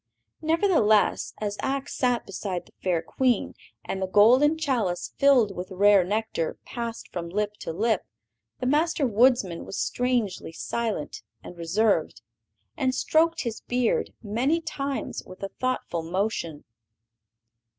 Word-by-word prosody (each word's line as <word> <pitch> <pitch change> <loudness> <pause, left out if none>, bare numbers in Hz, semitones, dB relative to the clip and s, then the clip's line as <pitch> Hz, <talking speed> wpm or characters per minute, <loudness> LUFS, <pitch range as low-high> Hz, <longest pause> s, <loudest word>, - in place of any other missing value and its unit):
Nevertheless, 320 - +2
as 205 -1 -3
Ak 270 0 -2
sat 245 -2 0
beside 190 -2 -4
the - - -21
fair 175 -3 0
Queen, 250 0 0 0.3
and 190 - -3
the 190 - 0
golden 250 +11 +5
chalice, 235 - -1
filled 250 -8 +4
with 180 +1 -5
rare 200 0 +5
nectar, 205 -4 -2
passed 235 -2 -5
from 170 -1 -4
lip 210 +3 -1
to - - -4
lip, 220 +7 +1 0.6
the 255 - -3
Master 305 +3 +2
Woodsman 230 -6 +3
was - - -7
strangely 240 -9 -1
silent 220 -3 -3 0.2
and - - -10
reserved, 195 +6 0 0.5
and 260 -4 0
stroked 325 +1 +2
his 235 -3 -4
beard 245 -1 0
many 245 +10 +1
times 280 -4 -4
with 185 - -12
a 195 - -2
thoughtful 255 -10 -2
motion. 170 -3 -2
220 Hz, 130 wpm, -26 LUFS, 190-260 Hz, 0.6 s, golden